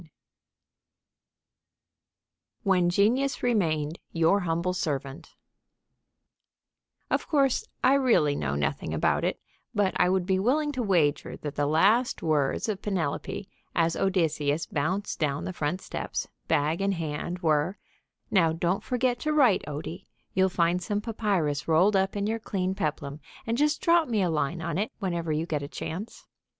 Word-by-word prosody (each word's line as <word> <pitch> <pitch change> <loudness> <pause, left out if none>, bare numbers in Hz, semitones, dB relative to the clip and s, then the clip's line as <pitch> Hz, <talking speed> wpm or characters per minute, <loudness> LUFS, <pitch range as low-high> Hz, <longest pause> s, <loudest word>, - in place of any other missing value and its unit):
III - - -17 2.5
WHEN 185 -3 +3
GENIUS 235 +9 +2
REMAINED 165 -10 0
YOUR 165 +4 +3
HUMBLE 170 0 -1
SERVANT 140 -5 -4 1.8
Of - - 0
course, 275 -5 +2 0.2
I 260 - +6
really 235 - +3
know 70 - -2
nothing 75 0 -2
about - - +1
it, - - -1 0.4
but 200 -2 +2
I 180 - +4
would 185 -1 +1
be 190 0 +1
willing 295 +8 +1
to 260 -3 -3
wager 175 -9 +1
that 145 -2 -5
the 145 0 0
last 205 - +3
words 150 +1 +1
of 210 -3 -2
Penelope, 190 0 -2 0.3
as 165 -1 +2
Odysseus 160 -5 +1
bounced 180 +8 -2
down 145 -3 -1
the 185 - -4
front 170 +3 -2
steps, - - -4 0.2
bag 155 +5 +1
in 195 0 +1
hand, 165 +1 -3
were: 155 +4 +2 0.5
"Now, 165 -5 +4
don't 175 +3 0
forget 250 -1 0
to 305 0 -1
write, 255 -10 +4
Odie. 155 +5 -6 0.3
You'll 190 0 +3
find 175 0 +1
some 205 +2 -2
papyrus 195 -10 -1
rolled 180 +6 +4
up 195 +1 +1
in 200 0 -1
your 225 +2 -1
clean 190 -3 -2
peplum, 150 -4 -3 0.3
and 230 - 0
just 300 +4 +1
drop 335 -1 +4
me 220 -5 +1
a 175 - +1
line 160 +2 -1
on 165 +2 -2
it 210 - -1
whenever 170 -5 -2
you 155 +2 0
get 155 -4 -2
a 140 - -5
chance." 185 +8 -6
180 Hz, 155 wpm, -27 LUFS, 155-210 Hz, 2.5 s, I